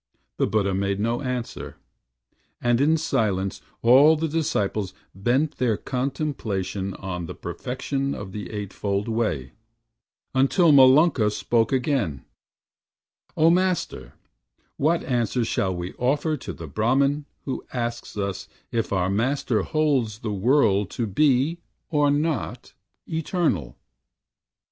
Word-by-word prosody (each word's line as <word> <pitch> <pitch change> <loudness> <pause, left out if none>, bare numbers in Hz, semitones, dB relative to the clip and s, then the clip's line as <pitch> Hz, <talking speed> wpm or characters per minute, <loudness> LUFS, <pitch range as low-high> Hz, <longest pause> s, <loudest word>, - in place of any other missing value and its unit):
The - - +2
Buddha 100 -2 +1
made 100 +1 -1
no 115 +3 0
answer, 125 -3 -4 0.8
and 120 +1 +2
in 155 +3 +4
silence 105 -11 -1 0.2
All 135 +7 +7
the 160 +1 -1
disciples 105 - -1 0.2
bent 125 +10 0
their 120 -4 +1
contemplation 120 - -3
On 90 -3 -5
the - - -7
perfection 135 +2 -3
of 100 -2 -7
the 100 -3 -6
Eight 105 -1 -5
fold 100 +1 -2
Way, 110 - -1 0.8
Until 140 +6 +4
Malunka 135 -3 +6
spoke 115 +2 +1
again: 125 - 0 1.1
"O 160 +1 +5
Master, 175 - 0 0.6
What 165 +4 +1
answer 120 -1 0
shall 95 -4 0
we 90 +1 -5
offer 145 +5 +1
to 135 - -7
the 85 - -8
Brahman 135 - +1 0.2
Who 135 - -3
asks 120 -3 -4
us 100 -2 -3 0.2
if 115 -1 -1
our 95 -1 +1
Master 115 +1 0
holds 140 - 0
the 110 -2 -3
World 105 -2 +3
To 120 - 0
be, 140 - +2 0.3
or 145 -2 +3
not, 150 +2 -1 0.3
Eternal?" 160 - -1
120 Hz, 120 wpm, -24 LUFS, 100-145 Hz, 1.1 s, All